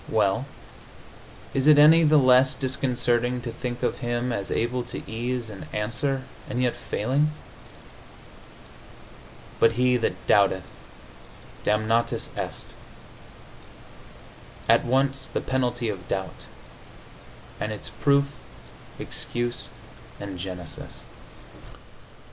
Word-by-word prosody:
Well, - - +1 1.1
is 135 +1 +1
it 150 -1 +8
any 160 +3 +8
the 155 0 +5
less 130 -1 +5
disconcerting 125 -2 +1
to 115 - -5
think 120 +1 -5
of - - 0
Him 120 +1 -1
as 100 -4 -3
able 120 +2 0
to - - -7
ease 120 +2 -3
and 100 -7 -9
answer, 130 +6 -1 0.3
and 125 - -2
yet 125 -1 +1
failing?... 135 +8 0 2.3
But 115 - +5
he 125 +1 +3
that 115 -6 0
doubteth 95 -3 +4 1.0
damnatus 110 +2 +1
est. - - -5 1.9
At - - +5
once 135 +1 +1
the - - -2
penalty 125 -2 -1
of 95 -5 -5
doubt 95 -1 -4 1.1
and 105 - -2
its 105 - -5
proof, 140 -1 +3 0.7
excuse 120 0 -3 0.5
and 100 -3 -6
genesis. 90 -2 -7
120 Hz, 100 wpm, -25 LUFS, 110-130 Hz, 2.3 s, it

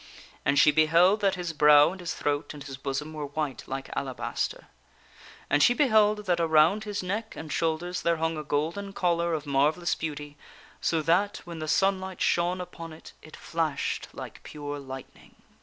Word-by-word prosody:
And 140 +1 +2
she 150 +2 +7
beheld 165 +7 +4
that 195 -1 +2
his 175 -2 -4
brow 150 0 +6
and 190 - -9
his 175 -2 -4
throat 145 +1 -2
and 145 - -9
his 135 -1 -7
bosom 135 +3 -4
were 150 -2 -4
white 145 -2 -3
like 135 0 -5
alabaster. 130 -2 -3 0.8
And 145 - +2
she 245 - +5
beheld 215 -6 +3
that 175 -2 +1
around 165 +6 +4
his 205 -2 -3
neck 205 +5 -3
and 160 -1 -7
shoulders 170 +2 -1
there 170 0 +1
hung 160 0 -1
a 155 - -5
golden 165 +7 -2
collar 170 -2 +1
of 150 -1 -5
marvellous 150 +5 +1
beauty, 145 -2 -5 0.4
so 160 -2 +1
that 185 +6 +1
when 170 -2 -7
the 155 - -4
sunlight 190 +2 +1
shone 175 +1 +1
upon 170 -2 -8
it 155 - -13
it 155 - -13
flashed 160 -4 -2
like - - -9
pure 145 -1 -6
lightning. 135 -1 -11
160 Hz, 175 wpm, -27 LUFS, 150-180 Hz, 0.8 s, she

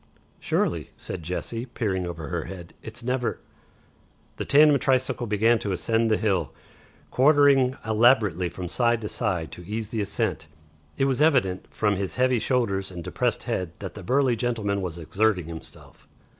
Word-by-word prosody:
"Surely," - - -1
said 90 - -6
Jessie, 115 +8 -4
peering 95 -7 -2
under 80 -4 -6
her - - -3
hand. 90 -3 -9
"It's 110 +2 -8
never 125 0 -1 0.5
" - - -35
The - - -3
tandem 145 0 +6
tricycle 130 -2 +1
began 110 +3 +3
to 100 -2 -2
ascend 115 +5 +1
the 110 - +3
hill, 95 - 0 0.6
quartering 135 -2 +4
elaborately 110 -6 +3
from 90 0 -6
side 120 +4 +1
to 105 - -3
side 85 -6 -2
to 90 - -10
ease 105 +3 -4
the 110 -2 -2
ascent. 100 - -2 0.5
It 135 - +2
was 135 0 0
evident, 125 - +2
from 105 -2 0
his 95 -1 -3
heaving 125 -1 +2
shoulders 110 -5 0
and 90 -2 -7
depressed - - -1
head, 90 -3 -3
that 95 -2 -7
the - - -9
burly 130 -1 +2
gentleman 110 -4 -1
was 90 -3 -4
exerting 90 +3 0
himself. 80 0 -11
110 Hz, 165 wpm, -25 LUFS, 95-125 Hz, 0.6 s, tandem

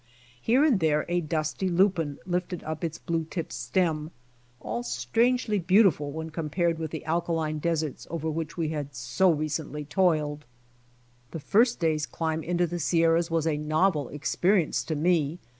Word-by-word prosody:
Here 255 +6 +4
and 260 -10 +3
there 155 -2 +2
a 175 0 +1
dusty 155 +3 -2
lupine 175 -5 +2
lifted* 180 0 -2
up 155 +2 -5
its 165 -1 -2
blue 165 -1 -2
tipped 165 0 -5
stem, 155 +5 -1 0.5
all 110 +3 -4
strangely 210 - +1
beautiful 180 -5 +3
when 160 +2 -6
compared 165 +1 -1
with 160 -1 -3
the 160 0 -6
alkaline 160 -1 -1
deserts 160 -3 -2
over 160 -1 -3
which 160 +1 -3
we 165 -2 0
had 145 -3 -5
so 120 +11 +2
recently 150 -1 -3
toiled. 155 -4 +1 0.9
This 160 0 -7
first 235 +3 +3
day's 155 -2 0
climb 160 -1 -2
into 175 +2 0
the 175 +1 -4
Sierras 165 0 +2
was 165 -1 0
a 155 -2 +1
novel 155 -1 +1
experience 175 +4 +1
to 160 - -2
me. 160 -1 +1
160 Hz, 160 wpm, -27 LUFS, 150-175 Hz, 0.9 s, Here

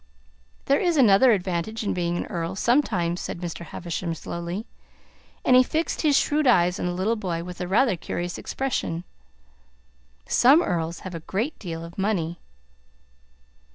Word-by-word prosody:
"There 280 - +3
is 345 -3 +1
another 240 0 +6
advantage 195 +2 -1
in 205 - -1
being 175 -1 -1
an - - -3
earl, 170 +1 -4
sometimes," 190 -8 +1
said - - -5
Mr. 170 -1 -5
Havisham 170 0 -4
slowly, 170 +6 -5 0.8
and 250 - +5
he 255 - +8
fixed 315 +6 -1
his 295 -3 +4
shrewd 300 -1 +2
eyes 180 -6 +4
on - - -1
the - - -1
little 190 +6 0
boy 175 -6 -3
with 180 +1 -8
a 180 - -2
rather 215 +3 +3
curious 175 +1 -4
expression. 210 -10 -2 1.2
"Some 280 +8 +5
earls 170 - -2
have 185 - -7
a 165 - -4
great 215 - -3
deal 165 -3 -6
of 170 +3 -11
money." 175 -5 -1
185 Hz, 155 wpm, -25 LUFS, 170-240 Hz, 1.2 s, he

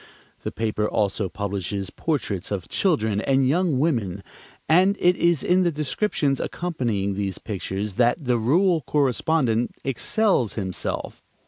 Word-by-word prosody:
The - - -4
paper 105 -1 -1
also 100 -2 0
publishes 100 0 -3
portraits 105 - -2
of 95 -6 -3
children 110 - +1
and 135 +1 +2
young 165 0 +2
women, 115 - 0 0.4
and 185 +5 +4
it 180 0 +4
is 170 -4 +2
in 180 +1 +3
the 175 -2 +2
descriptions 150 -1 0
accompanying 120 - -2
these 100 -1 -3
pictures 100 0 -4
that 120 +5 +2
the 120 -1 +2
rural 165 - +3
correspondent 135 -4 +1
excels 135 - +1
himself. 95 -4 -4
125 Hz, 130 wpm, -24 LUFS, 100-160 Hz, 0.4 s, and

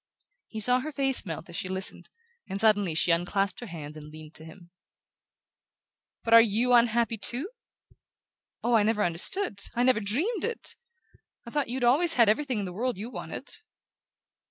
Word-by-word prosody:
He 220 - -6
saw 250 +4 +4
her 305 +4 -5
face 270 -6 +2
melt 165 -1 -6
as 170 - -10
she 185 - -2
listened, 190 0 -4 0.4
and 195 +1 -3
suddenly 205 -6 +3
she 170 - +2
unclasped 185 +3 0
her 240 - -8
hands 155 -4 -8
and 150 -1 -10
leaned 155 0 -12
to 160 - -6
him. 170 +2 -14 1.5
"But 230 - +1
are 230 - +11
YOU 230 +3 +2
unhappy 235 -1 +3
too? 270 - -1 1.1
Oh, 240 - +1
I 225 - +5
never 210 0 +1
understood 200 - -2 0.2
I 240 - +2
never 255 -3 +4
dreamed 315 - 0
it! 465 -1 -2 0.7
I 235 - -9
thought 290 -3 -1
you'd 250 +1 -3
always 305 +8 +4
had 235 -6 +5
everything 255 +2 0
in 205 - -2
the 180 - -6
world 245 +2 -2
you 220 +5 -6
wanted!" - - -6
220 Hz, 175 wpm, -27 LUFS, 190-250 Hz, 1.5 s, are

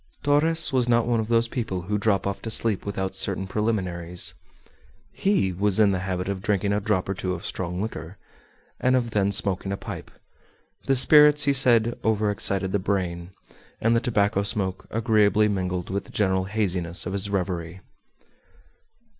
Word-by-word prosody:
Torres 155 +2 +4
was 125 -2 +2
not 120 -1 +3
one 120 -1 +1
of 110 - -2
those 115 0 +2
people 110 -7 -4
who 105 +3 -2
drop 100 -2 +1
off 100 0 -3
to 115 - -5
sleep 110 -3 -1
without 95 -2 -3
certain 95 0 -2
preliminaries. 90 -5 -2 0.8
He 190 - 0
was 100 +2 0
in 105 -2 +5
the 95 - -1
habit 90 0 -3
of 100 -1 -3
drinking 100 0 0
a 105 - +1
drop 100 -3 -1
or 95 - -1
two 95 -1 -3
of 90 +4 -9
strong 90 -1 -4
liquor, 95 -3 -6 0.6
and 130 0 +2
of 120 -2 -1
then 100 -1 +1
smoking 95 -1 -1
a 100 - -2
pipe; - - -8 0.8
the 135 - +3
spirits, 150 +3 +6
he 140 -1 +2
said, 120 -3 +3
overexcited 105 -3 +1
the 100 - 0
brain, 90 -3 -2 0.5
and 115 +1 +2
the - - +4
tobacco 105 -4 +1
smoke 100 -3 -2
agreeably 110 -2 +2
mingled 90 -3 -3
with 100 +1 -3
the - - -14
general 95 -2 0
haziness 95 -4 -1
of 90 - -4
his 100 0 -2
reverie. 90 -3 -3
100 Hz, 170 wpm, -24 LUFS, 95-115 Hz, 0.8 s, spirits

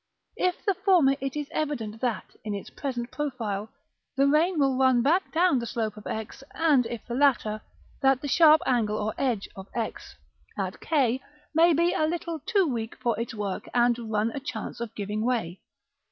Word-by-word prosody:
If 365 -1 -1
the 395 - +3
former, 360 -8 +4
it 270 0 -3
is 295 -1 -3
evident 230 -8 -3
that, 230 -7 -2
in 210 -1 -3
its 200 - -7
present 245 -4 -4
profile, 225 -8 -3 0.5
the 275 - +4
rain 315 +5 +3
will 275 -3 +3
run 260 -2 +4
back 340 +8 +2
down 335 -4 +3
the 235 - -4
slope 220 -2 -2
of 210 - -10
X; 220 +5 -5
and 290 -7 +3
if 235 -1 -6
the 240 - -5
latter, 240 -5 +2 0.4
that 270 -1 +4
the - - -2
sharp 310 +3 +6
angle 220 -4 +1
or 215 0 -2
edge 240 -7 0
of 190 0 -9
X, 230 -2 -4 0.4
at - - -3
k, 265 -5 +1 0.3
may 330 +2 +5
be 340 +3 +2
a 310 - +1
little 335 0 -3
too 405 -5 +3
weak 235 -6 -3
for 235 -3 0
its 230 -1 -4
work, 200 -3 -4
and 240 -1 +2
run 215 +2 +1
a 280 - -4
chance 245 -6 -6
of 225 -1 -5
giving 210 +1 -3
way. 225 -8 -1
250 Hz, 190 wpm, -27 LUFS, 220-300 Hz, 0.5 s, sharp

